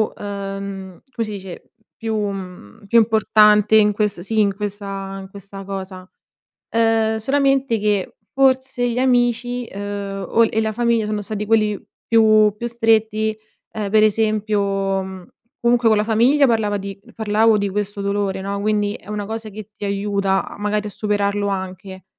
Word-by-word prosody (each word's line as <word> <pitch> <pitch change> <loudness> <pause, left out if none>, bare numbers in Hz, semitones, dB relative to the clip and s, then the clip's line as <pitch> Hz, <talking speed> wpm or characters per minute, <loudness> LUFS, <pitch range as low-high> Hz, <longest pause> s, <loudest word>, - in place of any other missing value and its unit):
uhm, 195 -2 -6
come 230 -4 -3
si - - -6
dice, 190 -3 -9 0.2
più 225 -1 -3
mhmm, 190 - -6
più 235 - +3
importante 215 -1 +4
in 210 -1 +5
ques 210 -3 -1
sì, 220 +3 -2
in 200 -2 +2
questa 195 -1 -5
in 190 - -10
questa 195 0 -10
cosa. 190 -1 -7 0.6
Uhm, 225 -1 +2
solamente 270 -1 +1
che, 205 -2 -1
f - - -46
forse 260 -2 +2
gli 235 - -2
amici, 245 -1 +1
uhm, 200 -1 -5
o 230 - +3
e 220 - -1
la 220 - -1
famiglia, 235 0 +1
sono 210 0 -2
stati 210 0 -4
quelli 215 -2 +2 0.3
più 215 -2 +5
più 235 - -4
stretti. 220 -2 +1 0.4
Ehm, 210 -3 -4
per 215 0 +4
esempio, 215 -1 +1 0.4
mhmm, 190 -1 -9 0.3
comunque 235 -1 +3
con 220 - +4
la 210 - +1
famiglia 245 +6 +4
parlava 215 -3 +1
di 195 0 -7 0.2
parlavo 220 0 +3
di 200 0 -1
questo 205 +1 -3
dolore, 200 -1 -1
no, 200 +1 -3
quindi, 205 0 0
è 195 - -13
una 210 -1 -4
cosa 220 0 -5
che 215 +1 -10
ti 205 - -7
aiuta 200 -1 0
a - - -11
magari, 210 0 -1
a 205 - -5
superarlo 205 0 -1
anche. 190 -1 -5
210 Hz, 165 wpm, -20 LUFS, 200-225 Hz, 0.6 s, in